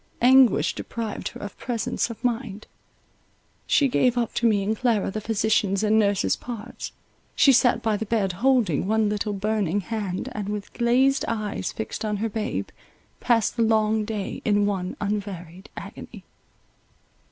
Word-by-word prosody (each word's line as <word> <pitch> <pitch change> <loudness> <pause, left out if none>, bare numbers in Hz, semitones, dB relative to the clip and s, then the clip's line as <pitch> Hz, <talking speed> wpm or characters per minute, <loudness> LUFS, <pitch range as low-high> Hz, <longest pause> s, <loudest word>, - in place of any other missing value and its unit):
Anguish 260 -1 +5
deprived 225 -3 -5
her - - -8
of 205 -2 -7
presence 235 -1 -2
of 230 +1 -9
mind; 230 -4 -2 1.0
she 285 - +4
gave 250 -1 +2
up 235 -1 0
to 235 - +2
me 205 -3 +2
and 215 +3 0
Clara 225 -4 +1
the 215 - -4
physician's 210 -2 +1
and 215 +1 +4
nurse's 200 -2 +2
parts; 235 -1 -7 0.4
she 275 - +6
sat 245 -2 +3
by 220 -2 +1
the 220 - -4
bed, 205 -4 +1
holding 215 - +1
one 220 0 +2
little 210 0 -2
burning 205 -2 0
hand, 200 -3 -4
and, 205 -1 -4
with 205 -1 -5
glazed 255 +3 +2
eyes 215 -3 -2
fixed 220 - -5
on 210 -1 -1
her 225 +3 -1
babe, 220 +1 -3 0.5
passed 230 -4 +2
the - - +1
long 220 -1 +2
day 210 -2 -4
in 205 -1 +2
one 190 -3 -2
unvaried 195 -3 -5
agony. - - -9
215 Hz, 155 wpm, -24 LUFS, 205-230 Hz, 1.0 s, she